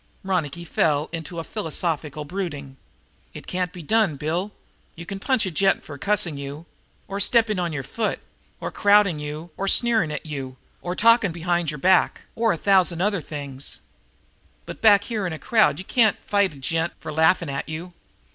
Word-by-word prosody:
But 190 - -9
Ronicky 170 -1 -1
fell 150 -2 +1
into 165 +1 -6
a 165 - -3
philosophical 160 -6 -2
brooding. 145 -6 -5 0.6
"It - - -9
can't 180 -1 -2
be 180 -2 -10
done, 215 -2 +2
Bill. 165 +8 -2 0.4
You 170 - -9
can 195 +3 -6
punch 255 +1 +1
a 190 - -3
gent 195 +4 +1
for 145 - -8
cussing 195 -6 0
you, 140 +3 -7 0.4
or 200 0 -4
stepping 220 -1 +3
on 175 -2 -1
your 145 -3 -4
foot, 215 - -2 0.4
or - - -4
crowding 205 -5 +4
you, 150 +3 -6
or 195 - -2
sneering 225 -7 +3
at 150 - -5
you, 135 -4 -6 0.2
or 180 +1 -3
talking 230 -3 +4
behind 170 0 -1
your 150 - -4
back, 185 +5 +3
or 225 0 +1
for - - +2
a - - -13
thousand 190 0 +3
things. 140 -3 -4 0.8
But - - -9
back 205 -2 +6
here 215 -4 -2
in 175 - -4
a - - -5
crowd 220 +6 +3
you 185 - -7
can't 220 -2 +3
fight 200 -4 +2
a - - -13
gent 165 +5 -1
for 155 - -7
laughing 160 0 +3
at 140 +2 -4
you. 170 +3 -6
175 Hz, 185 wpm, -23 LUFS, 150-200 Hz, 0.8 s, back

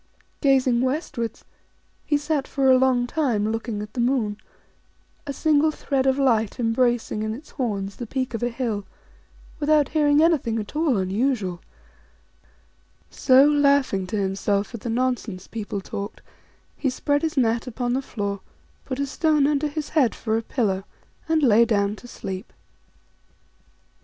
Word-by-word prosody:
Gazing 260 -4 +3
westwards, 255 -4 -3 0.6
he 295 - +1
sat 290 -1 -1
for 270 -1 +2
a 255 - +7
long 255 -2 +3
time 245 -7 0
looking 225 -2 -3
at 210 - -10
the - - -5
moon 235 -5 0 0.9
a - - -2
single 305 +2 +2
thread 270 -3 -1
of 265 0 +3
light 235 -4 +1
embracing 240 -1 +1
in 215 0 -2
its 295 +5 -13
horns 200 -7 -3
the 240 - -6
peak 255 +1 -3
of 230 - -3
a 240 - +1
hill 230 -4 -3 0.8
without 300 -1 +3
hearing 295 -1 +3
anything 285 -9 +2
at 215 +5 -6
all 305 -6 +2
unusual; 195 -1 -1 1.5
so, 260 +1 +5
laughing 280 -9 +2
to 215 +3 -3
himself 200 +1 -1
at 230 - -7
the 235 - -4
nonsense 235 -5 -1
people 205 -3 -5
talked, 200 +2 -7 0.5
he 275 - -1
spread 285 +3 0
his 320 -2 -2
mat 230 -1 +1
upon 245 0 -2
the 265 - 0
floor, 200 -6 -4 0.5
put 260 - -4
a 280 - 0
stone 300 +1 +2
under 295 +1 +1
his 295 0 -4
head 280 -8 +2
for 220 -1 -2
a 225 - 0
pillow, 205 -5 -1 0.5
and 320 -1 +2
lay 230 -3 +6
clown 205 -3 +1
to 245 - -12
sleep. 190 -3 -7
245 Hz, 155 wpm, -24 LUFS, 215-280 Hz, 1.5 s, a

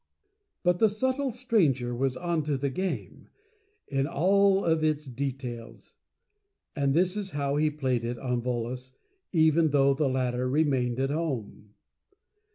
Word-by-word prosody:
But 180 -1 +2
the 220 - +5
Subtle 260 +5 -1
Stranger 170 - +1
was 130 +1 -1
Onto 155 -5 -1
the 140 0 -2
Game, 185 +6 -4 0.6
in 135 0 0
all 195 +5 +3
of 160 -2 +2
its 155 -1 0
Details. 125 -3 -6 0.8
And 140 -2 +1
this 180 +3 +2
is 205 -2 -3
how 140 0 0
he 155 +1 +3
Played 130 -5 -1
it 120 +1 -3
on 125 -1 -2
Volos, 125 +1 -4 0.4
even 160 -1 +4
though 140 -1 +4
the 140 0 0
latter 125 -1 -1
Remained 130 -4 +1
at 135 +1 0
Home. 125 -9 -4
140 Hz, 140 wpm, -28 LUFS, 130-170 Hz, 0.8 s, the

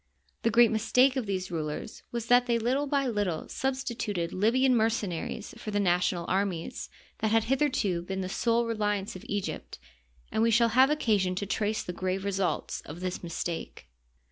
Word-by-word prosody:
The 230 - +2
great 230 0 +5
mistake 250 +4 +3
of 255 -5 -2
these 185 -1 -2
rulers 155 +5 -4
was 235 -2 -3
that 245 +1 +4
they 235 -1 +2
little 255 +5 0
by 280 -1 +1
little 205 -9 -1
substituted 235 -9 -2
Libyan 250 +6 +3
mercenaries 220 -3 -1
for - - -6
the 205 -1 0
national 180 -2 +1
armies 190 -3 -2 0.3
that 220 - +1
had 225 0 +3
hitherto 255 -10 +1
been 190 +2 -4
the 185 - -3
sole 230 +4 +1
reli 210 -2 0
ance 195 0 -6
of 185 - -9
Egypt, 200 -1 -4 0.5
and - - 0
we 230 - +4
shall 230 +1 +4
have 260 +4 +5
occasion 210 -11 +1
to 200 - -2
trace 215 +2 -1
the 180 - -5
grave 185 +2 -2
results 195 -2 -1
of 150 +3 -9
this 185 0 -3
mistake. 170 - -5
210 Hz, 175 wpm, -29 LUFS, 185-235 Hz, 0.5 s, great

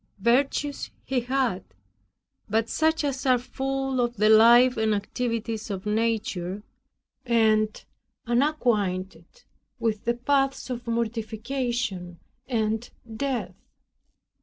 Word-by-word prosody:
Virtues 270 +6 +1 0.2
he 265 -1 0
had, 245 -6 -1 0.9
but 220 +2 +1
such 320 0 +1
as 275 -2 -2
are 255 -1 +5
full 270 +1 -2
of 240 -1 -1
the 215 +1 +4
life 235 +3 +7
and 220 -1 +1
activities 225 +1 -3
of 195 -1 -5
nature, 210 -3 -1 0.6
and 220 -3 +2 0.4
unacquainted 240 - -1 0.3
with 215 -2 -1
the 235 0 +1
paths 270 +1 0
of 240 -1 -5
mortification 230 -4 -2 0.3
and 220 -1 -1 0.3
death. 240 -8 -2
235 Hz, 100 wpm, -26 LUFS, 215-255 Hz, 0.9 s, life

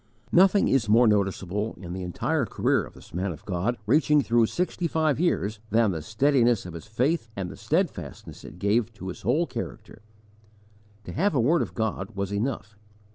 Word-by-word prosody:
Nothing 190 +3 +5
is 120 -6 +2
more 115 +3 +6
noticeable, 100 0 0
in 85 -2 -7
the 95 - -5
entire 90 -2 -1
career - - +1
of - - -15
this - - -16
man 95 +3 -1
of 80 - -10
God, 100 +6 -1
reaching 150 +4 +4
through 115 -2 +3
sixty 180 +2 -1
five 155 -3 +1
years, 110 - 0
than 110 -2 +3
the 80 -3 -4
steadiness 120 - +2
of 90 - -7
his 85 +6 -9
faith 125 +4 0
and 95 -2 -4
the - - -9
steadfastness - - -3
it - - -11
gave 105 +4 +1
to 95 -3 -7
his 90 - -8
whole 170 +3 +2
character. 115 - -7 1.0
To - - -8
have 190 0 +1
a - - +3
word 150 +8 +3
of - - -4
God 110 -2 -3
was 100 0 -3
enough. 110 -1 -3
110 Hz, 185 wpm, -26 LUFS, 95-135 Hz, 1.0 s, more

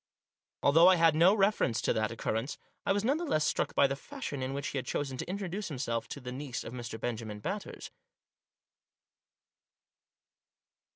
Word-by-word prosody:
Although 165 +5 +7
I 185 -2 +6
made 165 -2 +6
no 170 +6 +6
reference 195 - +2
to - - +1
that 110 -1 0
occur 115 - -2
rence, 115 +6 -2 0.3
I - - +4
was 200 +1 +1
none 270 +6 +2
the 345 - -3
less 155 - +1
struck - - 0
by - - +6
the 135 0 0
fashion 190 - -6
in 130 +1 -2
which 140 +1 -3
he 140 - -2
had - - -7
chosen 135 -2 -2
to - - -5
introduce 195 +1 -3
himself 115 -5 -2
to - - -6
the 125 -2 -7
niece 130 -1 -5
of 120 - -8
Mr. 120 -2 -6
Benjamin 110 -3 -4
Batters. 195 - -5
140 Hz, 180 wpm, -31 LUFS, 120-190 Hz, 0.3 s, Although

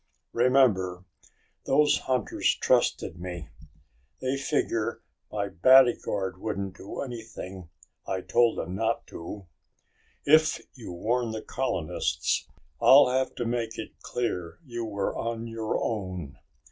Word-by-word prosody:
"Remember, 115 -8 +3 0.6
those 150 0 +4
hunters 125 -4 0
trusted 85 - +1
me. 85 -4 -6 0.7
They 130 +1 -1
figure 115 -5 -1 0.3
my 100 -1 -1
bodyguard 105 -3 +4
wouldn't 100 -3 -3
do 100 - -7
anything 110 -8 -7 0.4
I 95 -1 -2
told 120 +3 +3
him 90 - -4
not 110 +4 -1
to. 95 +4 -8 0.8
If 155 +2 +5
you 120 -7 -9
warn 115 +7 0
the 110 0 -5
colonists, 85 -8 -1 0.3
I'll 135 -1 +8
have 130 +1 0
to 120 - -3
make 115 -1 -2
it 110 - -8
clear 90 -9 -3
you 120 -3 -4
were 100 -3 -2
on 115 0 -3
your 115 -1 -2
own." 95 -9 -4
110 Hz, 120 wpm, -27 LUFS, 95-125 Hz, 0.8 s, I'll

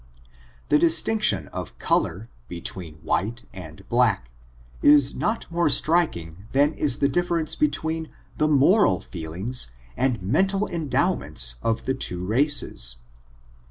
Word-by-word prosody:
The 150 - +4
distinction 170 +7 +2
of - - -7
color, 105 +5 -1 0.2
between 85 -2 -6
white 115 +4 -2
and 90 0 -11
black, 110 - +1 0.5
is 145 -2 +5
not 225 +2 -2
more 170 -1 +1
striking 105 - 0
than 145 +3 +3
is 145 -5 +1
the 140 - +2
difference 170 +1 -1
between 160 - -1 0.3
the 155 - +3
moral 145 - +4
feelings 90 - -4 0.3
and 125 -3 0
meyital 190 - +1
endowments 130 - 0
of 115 0 -1
the 130 - 0
two 90 -8 -2
races. 115 - +1
130 Hz, 120 wpm, -24 LUFS, -, 0.5 s, is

